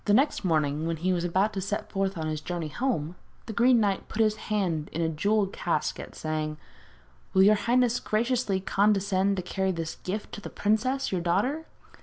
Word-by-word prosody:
Next 265 +7 +3
morning, 155 -3 +1
when 165 -1 -1
he 185 +4 +1
was 175 -1 -1
about 190 +5 +1
to 195 - -2
set 200 +2 -3
forth 195 -1 -1
on 160 - -3
his 155 -1 -2
journey 170 -2 -4
home, 175 - -1 0.3
the 225 - -6
Green 240 +2 +5
Knight 200 -3 0
put - - -9
into - - +6
his 215 -1 +2
hand 180 -8 0
a 165 +1 0
jewelled 200 +5 +1
casket, 155 -3 -2
saying: 155 -1 -3 0.8
'Will 190 - +7
your 205 +2 +7
highness 240 +2 +2
graciously 230 -2 0
condescend 200 0 +2
to 185 - -2
carry 190 +1 -1
this 165 -2 -4
gift 205 +3 -5
to 205 - -7
the - - -7
princess, 255 +6 0
your 185 -2 0
daughter? 250 - 0
195 Hz, 190 wpm, -27 LUFS, 170-215 Hz, 0.8 s, Will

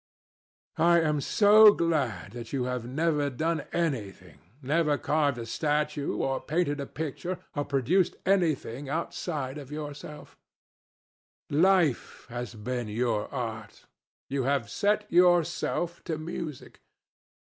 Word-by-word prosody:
I 170 0 +5
am 150 -2 +1
so 210 +4 +7
glad 140 - -1
that 120 0 -8
you 135 -3 -1
have 125 -1 -3
never 150 +1 0
done 160 +4 -2
anything, 100 - -3 0.2
never 150 +2 +2
carved 145 -4 +1
a 115 - -5
statue, 150 +3 -1
or 135 0 -1
painted 155 -2 -1
a 140 - -4
picture, 160 +4 -4 0.2
or 145 -1 -1
produced 140 +7 +1
anything 155 -8 0
outside 150 -2 -3
of 140 -1 -11
yourself! 150 0 -8 1.1
Life 165 -3 +2
has 120 0 -6
been 120 +2 -4
your 110 0 -1
art. 110 -5 -6 0.4
You 135 0 -1
have 135 -4 0
set 210 +1 +1
yourself 175 0 +2
to 160 -3 -2
music. 155 -2 -7
145 Hz, 120 wpm, -28 LUFS, 125-170 Hz, 1.1 s, so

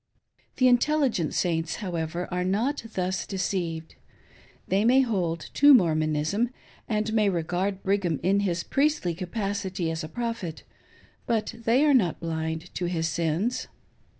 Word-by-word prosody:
The 255 - +4
intelligent 250 - +2
Saints, 165 -2 0
however, 175 -3 -3
are 180 0 -1
not 220 +10 0
thus 185 0 -1
deceived. 175 -4 -3 0.7
They 195 +2 +2
may 255 +4 +5
hold 180 -9 -2
to 285 0 +8
Mormonism, 155 +3 +1 0.4
and 215 0 0
may 215 -2 +3
regard 185 +3 -2
Brigham 190 -6 0
in 195 +3 +3
his 175 -4 -1
priestly 280 - +1
capacity 190 -1 -3
as 160 0 -4
a 155 - -6
Prophet; 230 -6 -4 0.6
but 225 -2 0
they 230 +5 +2
are 295 - +5
not 195 - +2
blind 160 +1 -4
to 180 - -2
his 165 -2 -1
sins. 170 +9 -1
185 Hz, 135 wpm, -26 LUFS, 165-225 Hz, 0.7 s, to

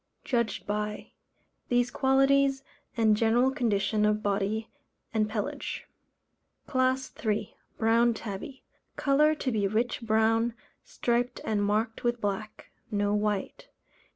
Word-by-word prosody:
Judged 235 -4 -1
by: 210 0 -3 0.6
These 245 0 +2
qualities, 270 0 +3 0.3
and 220 -2 +4
general 235 +4 +3
condition 215 -4 +1
of 210 0 +2
body 205 +2 -1 0.5
and 215 -1 +1
pelage. 215 -2 -4 0.8
CLASS 260 0 0
III. 215 -2 -1 0.2
Brown 230 +1 +3
Tabby. 225 +5 -7 0.3
Colour 300 +2 +3
to 265 -3 -2
be 210 -3 +1
rich 230 +5 -1
brown, 225 +1 +2 0.3
striped 245 +1 -1
and 210 -2 0
marked 215 +3 0
with 240 0 0
black 205 0 -4 0.2
no 205 -1 0
white. 210 -1 -2
225 Hz, 115 wpm, -28 LUFS, 210-245 Hz, 0.8 s, and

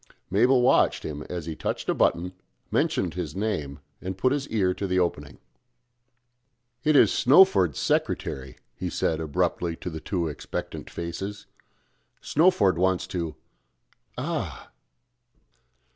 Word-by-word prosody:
Mabel 125 +6 +4
watched - - +3
him 75 -1 -5
as 90 -3 -4
he 80 -1 -5
touched - - -3
a - - +2
button 90 +2 +1 0.4
mentioned 90 -3 +1
his 85 -5 -5
name, 90 -9 -2 0.2
and 95 0 -5
put 130 +6 +2
his 140 0 -1
ear 95 -5 +1
to 100 - -4
the 90 0 0
opening. 75 -6 -1 1.5
"It 155 0 +3
is - - +6
Snowford's 130 - +5
secretary," 65 -1 -1 0.2
he - - -4
said 80 - 0
abruptly 80 +2 -1
to 90 - -6
the 80 - -5
two 85 -2 -1
expectant 75 - -6
faces. 95 +5 -5 0.7
"Snowford 150 - +3
wants 95 0 +2
to 85 -3 -3 0.8
ah!" - - -4
90 Hz, 130 wpm, -26 LUFS, 80-105 Hz, 1.5 s, is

